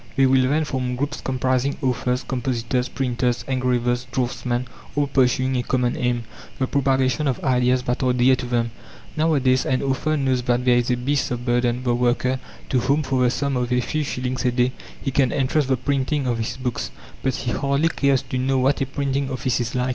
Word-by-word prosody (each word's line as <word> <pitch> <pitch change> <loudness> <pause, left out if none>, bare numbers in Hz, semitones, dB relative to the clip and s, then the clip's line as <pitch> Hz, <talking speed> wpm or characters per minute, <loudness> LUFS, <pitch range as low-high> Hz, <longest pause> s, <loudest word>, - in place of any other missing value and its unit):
They 135 - +4
will 130 -1 +4
then 155 +2 +2
form 130 -3 -2
groups 145 +4 -3
comprising 130 +1 0
authors, 125 -2 0
compositors, 125 0 -1
printers, 125 -2 -1
engravers, 125 -1 0
draughtsmen, 125 0 -1 0.3
all 145 0 +2
pursuing 130 -1 +2
a - - +1
common 125 0 0
aim 120 -1 0 0.3
the 130 - +1
propagation 135 0 +1
of 130 - 0
ideas 125 -1 +2
that 125 0 -1
are 130 -1 +3
dear 125 +1 +4
to 125 - -5
them. 120 -1 0 0.4
Nowadays 140 -5 +2
an 130 +1 0
author 140 +3 0
knows 130 -3 +1
that 125 0 0
there 125 -1 +5
is 120 0 +1
a 125 - +2
beast 135 +3 0
of 120 0 -4
burden, 120 0 +1
the 120 -1 +1
worker, 125 +2 +1 0.3
to 130 - +2
whom, 140 +5 +1
for 130 -1 0
the 125 - +4
sum 140 +2 -1
of 125 -1 -1
a 125 - +3
few 155 +5 -1
shillings 130 -2 -3
a 125 - +2
day, 125 +1 +2 0.3
he 135 - -3
can 130 -2 +2
entrust 140 +1 +1
the 130 -1 +2
printing 140 +2 0
of 120 -2 0
his 110 - -3
books; 125 -2 -3 0.3
but 130 -2 0
he 120 - -3
hardly 140 +5 +1
cares 140 -4 +1
to 130 -1 -3
know 135 +1 +1
what 135 +2 +2
a 135 - 0
printing 140 0 -1
office 130 -1 -1
is 120 0 -3
like. 125 0 0
130 Hz, 210 wpm, -22 LUFS, 125-135 Hz, 0.4 s, there